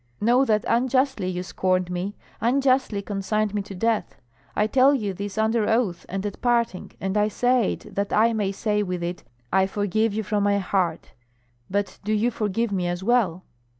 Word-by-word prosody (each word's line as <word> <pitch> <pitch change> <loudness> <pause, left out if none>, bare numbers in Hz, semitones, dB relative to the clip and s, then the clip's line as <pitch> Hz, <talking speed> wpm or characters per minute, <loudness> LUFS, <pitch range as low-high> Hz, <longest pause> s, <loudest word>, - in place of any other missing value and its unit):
Know 245 +5 +4
that 215 -3 +1
unjustly 260 -3 +1
you 180 -1 -2
scorned 185 -1 0
me, 180 +3 -3 0.2
unjustly 255 -3 +2
consigned 210 +1 -1
me 205 - 0
to 195 0 -9
death 225 +3 0 0.4
I 210 - +3
tell 265 +5 +4
you 210 -7 -2
this 200 +2 -6
under 220 0 +2
oath 220 -7 0
and 195 +2 -3
at 205 - -5
parting, 235 -6 0
and 190 +1 -2
I 210 0 +3
say 245 +1 +2
it - - -11
that 200 0 -2
I 230 +2 +4
may 205 -3 0
say 210 +1 0
with 180 -3 -3
it, 175 0 -4 0.3
I 190 0 +4
forgive 205 +2 0
you 220 - -1
from 210 0 0
my 200 0 +3
heart; 185 -4 -1 0.6
but 200 +1 -2
do 215 +2 0
you 220 +3 +2
forgive 220 0 -1
me 185 -3 0
as 175 +1 -3
well." 195 -6 +2
210 Hz, 185 wpm, -24 LUFS, 190-230 Hz, 0.6 s, Know